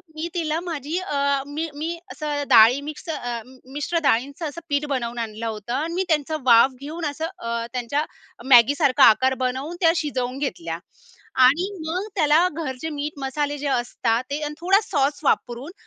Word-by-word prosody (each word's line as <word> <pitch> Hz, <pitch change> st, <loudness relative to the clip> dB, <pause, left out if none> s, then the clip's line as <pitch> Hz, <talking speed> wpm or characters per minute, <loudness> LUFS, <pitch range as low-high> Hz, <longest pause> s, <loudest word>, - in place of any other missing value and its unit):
मी 320 Hz, +2 st, -3 dB
तिला 325 Hz, -2 st, -1 dB
माझी 325 Hz, -2 st, -4 dB
अ, 370 Hz, -6 st, -3 dB, 0.3 s
मी 310 Hz, +3 st, -4 dB
मी 325 Hz, +3 st, -3 dB
असं 295 Hz, -1 st, -3 dB
डाळी 235 Hz, +5 st, +7 dB
मिक्स 310 Hz, +2 st, -12 dB
अ, 245 Hz, -6 st, -3 dB, 0.3 s
मिश्र 295 Hz, +4 st, -2 dB
डाळींचं 280 Hz, +6 st, +1 dB
असं, 335 Hz, +4 st, -9 dB
पीठ 285 Hz, +1 st, 0 dB
बनवून 240 Hz, -2 st, -3 dB
आणलं 225 Hz, 0 st, -4 dB
होतं 220 Hz, +2 st, -5 dB
आणि 315 Hz, +5 st, -2 dB
मी, 375 Hz, +2 st, 0 dB
त्यांच 310 Hz, -2 st, 0 dB
वाफ 235 Hz, +2 st, +6 dB
घेऊन 315 Hz, +3 st, -5 dB
असं 315 Hz, +3 st, -4 dB
अ, 230 Hz, 0 st, -3 dB
त्यांच्या 270 Hz, +5 st, -1 dB, 0.5 s
Maggi 240 Hz, +4 st, +7 dB
सारखा 280 Hz, -5 st, +4 dB
आकार 260 Hz, +5 st, +3 dB
बनवून, 265 Hz, +7 st, -3 dB
त्या 330 Hz, -, +6 dB
शिजवून 260 Hz, -5 st, -2 dB
घेतल्या 170 Hz, -, -3 dB, 0.6 s
आणि 305 Hz, +9 st, +4 dB, 0.2 s
मग 365 Hz, +6 st, -2 dB
त्याला 305 Hz, -2 st, +4 dB
घरचे 305 Hz, -1 st, -5 dB
मीठ 295 Hz, +2 st, -3 dB
मसाले, 290 Hz, +2 st, -2 dB
जे 285 Hz, 0 st, -4 dB
असतात 240 Hz, -2 st, 0 dB
ते 285 Hz, +2 st, -2 dB
आणि 295 Hz, -, -4 dB
थोडा 385 Hz, +4 st, +4 dB
सॉस 285 Hz, -5 st, 0 dB
वापरून, 255 Hz, +3 st, 0 dB
285 Hz, 170 wpm, -23 LUFS, 245-315 Hz, 0.6 s, डाळी